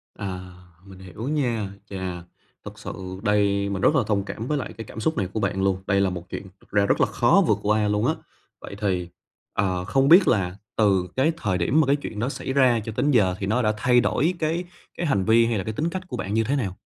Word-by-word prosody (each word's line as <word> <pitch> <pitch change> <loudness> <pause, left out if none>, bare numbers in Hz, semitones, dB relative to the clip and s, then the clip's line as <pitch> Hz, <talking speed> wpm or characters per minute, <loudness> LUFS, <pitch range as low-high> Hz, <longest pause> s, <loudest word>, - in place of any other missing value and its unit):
À, 90 -2 -6 0.3
mình 95 -1 -13
hiểu 95 +6 -8
nha. 120 -9 -1 0.2
Chà, 95 -3 -5 0.4
thực - - -9
sự - - -6 0.3
đây 100 -1 +2
mình 95 -1 -3
rất 150 - +4
là 130 - +3
thông 100 -2 +1
cảm 110 +3 -6
với 150 +1 0
lại 130 - -5
cái 115 - -6
cảm 110 - -9
xúc 155 +5 -1
này 95 -3 0
của 110 - -1
bạn 95 -1 -1
luôn, 95 -1 0
đây 100 -1 +3
là 95 - +2
một 90 -1 -7
chuyện - - -5 0.2
thật - - -24
ra 100 -1 +3
rất - - +1
là - - +4
khó - - +3
vượt - - +3
qua 105 0 +2
luôn 105 0 +1
á. - - +2 0.5
Vậy - - -8
thì, 90 -3 -1 0.4
ờ, 90 -2 -1
không 135 +5 +2
biết 180 +3 +8
là 95 -4 +1 0.2
từ 95 -4 +2
cái 140 +5 +3
thời 105 - -1
điểm 120 - +2
mà 140 - +1
cái 140 - +4
chuyện 110 -7 -6
đó 125 +5 0
xảy 130 - -4
ra 130 -4 +4
cho 110 - -4
tới 125 - 0
giờ 95 -7 +3
thì 95 - -2
nó 110 +5 +1
đã 105 -1 +2
thay 125 +2 +4
đổi 155 +8 +1
cái 165 +3 0 0.3
cái 175 - -2
hành 100 -10 +1
vi 115 +1 +5
hay 115 -2 0
là 95 - -2
cái 110 - -4
tính 160 +8 -1
cách 185 0 -6
của - - -5
bạn 100 - -4
như 115 0 +2
thế 135 +6 0
nào? 100 -9 -2
105 Hz, 260 wpm, -24 LUFS, 95-130 Hz, 0.5 s, biết